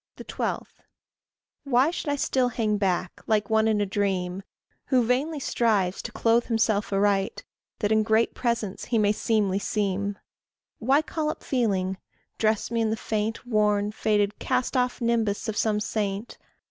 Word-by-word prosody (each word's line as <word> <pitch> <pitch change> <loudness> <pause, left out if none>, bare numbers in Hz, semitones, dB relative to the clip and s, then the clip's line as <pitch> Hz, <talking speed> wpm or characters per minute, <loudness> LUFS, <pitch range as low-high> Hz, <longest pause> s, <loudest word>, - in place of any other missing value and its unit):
12. - - -3 1.0
Why 275 +2 +3
should 330 - -4
I 285 - +1
still 260 -2 +1
hang 220 -3 0
back, 185 -2 -1
like 215 -1 +1
one 220 0 +4
in 215 -1 +2
a 205 - +2
dream, 190 -2 -1 0.5
Who 255 -3 +3
vainly 280 +6 0
strives 210 -8 +1
to - - -6
clothe 230 +1 +2
himself 220 -3 +1
aright, 195 0 +1 0.4
That 210 -1 +1
in 220 0 +4
great 220 +1 +2
presence 235 -5 -2
he 240 - 0
may 205 -1 +3
seemly 210 -3 +1
seem? 200 -1 -1 0.6
Why 270 +6 +3
call 310 -1 -2
up - - -5
feeling? 190 -7 0 0.4
dress 220 0 +1
me 230 -1 +1
in 220 - +1
the 220 - -1
faint, 220 +2 -2
Worn, 210 -3 +2
faded, 210 -1 0
cast 255 - -1
off 250 0 0
nimbus 230 -3 0
of 220 - -2
some 215 -1 +1
saint? 205 0 -3
215 Hz, 160 wpm, -26 LUFS, 205-235 Hz, 1.0 s, one